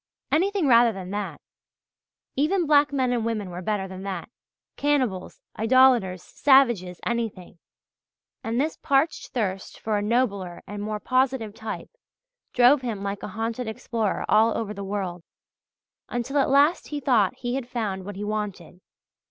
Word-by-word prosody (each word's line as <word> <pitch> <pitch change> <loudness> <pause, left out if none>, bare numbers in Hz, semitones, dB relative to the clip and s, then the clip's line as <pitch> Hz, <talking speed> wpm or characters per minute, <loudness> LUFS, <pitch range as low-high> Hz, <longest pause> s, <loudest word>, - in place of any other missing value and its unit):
Anything 385 +2 +2
rather 235 -3 +6
than 190 -3 -7
that! 205 -1 -4 1.0
Even 335 +6 +1
black 290 -1 +4
men 260 -3 +1
and 235 -2 0
women 215 -5 -2
were 175 +1 -6
better 195 0 -2
than 190 0 -8
that 195 +1 -5 0.5
cannibals, 255 -11 -1 0.2
idolators, 225 -6 +4
savages, 235 -11 +3
anything! 220 -7 -3 0.8
And 225 +2 -1
this 310 +3 -1
parched 280 +2 +1
thirst 195 -6 -3
for 215 -2 -1
a - - -2
nobler 205 -5 -1
and 205 +1 -6
more 210 0 -3
positive 255 -3 0
type 220 0 -7 0.6
drove 250 +3 +5
him 225 -6 -4
like 200 0 -3
a - - -5
haunted 230 +2 -2
explorer 220 -1 -2
all 220 +1 +4
over 215 -2 -3
the 200 -1 -6
world, 190 -3 -4 0.9
until 245 +4 -1
at 275 - +2
last 285 +5 +3
he 295 - -4
thought 240 -8 +2
he 245 -1 -3
had 255 -2 -3
found 210 -6 -3
what 205 +1 -7
he 200 - -5
wanted. 205 -4 -4
225 Hz, 150 wpm, -25 LUFS, 200-260 Hz, 1.0 s, rather